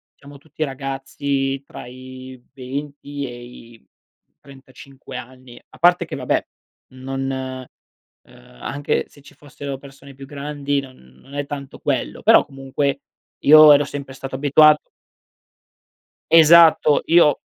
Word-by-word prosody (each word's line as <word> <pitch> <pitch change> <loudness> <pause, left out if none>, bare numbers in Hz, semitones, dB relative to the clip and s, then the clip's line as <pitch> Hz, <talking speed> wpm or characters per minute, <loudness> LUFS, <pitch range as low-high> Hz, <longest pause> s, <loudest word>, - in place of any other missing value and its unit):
siamo 140 0 -15
tutti 155 +2 -15
ragazzi 135 0 -4
tra - - -11
i 130 +1 -11 0.2
20 140 +2 -7
e 120 -1 -9
i 120 -1 -15 0.6
35 135 -1 -14
anni. 125 0 -11
A - - -19
parte 175 +1 +4
che - - -7
vabbè - - -1 0.5
non, 135 +1 -6
uhm, 130 -1 -8 0.7
anche 145 +1 -2
se 145 - -20
ci 140 - -17
fossero 145 -1 -8
persone 140 0 -15
più 135 +1 -11
grandi 145 0 -3
non 135 -2 -10 0.3
non 140 - -17
è 145 0 -3
tanto 140 -1 -8
quello, - - -3
però - - +6
comunque 135 +1 -3 0.4
io 155 0 +8
ero 145 - +4
sempre 140 -1 -8
stato 130 0 -7
abituato 150 +2 +4 1.5
Esatto, 165 -2 +6
io 165 -4 +4
140 Hz, 125 wpm, -20 LUFS, 130-145 Hz, 1.5 s, io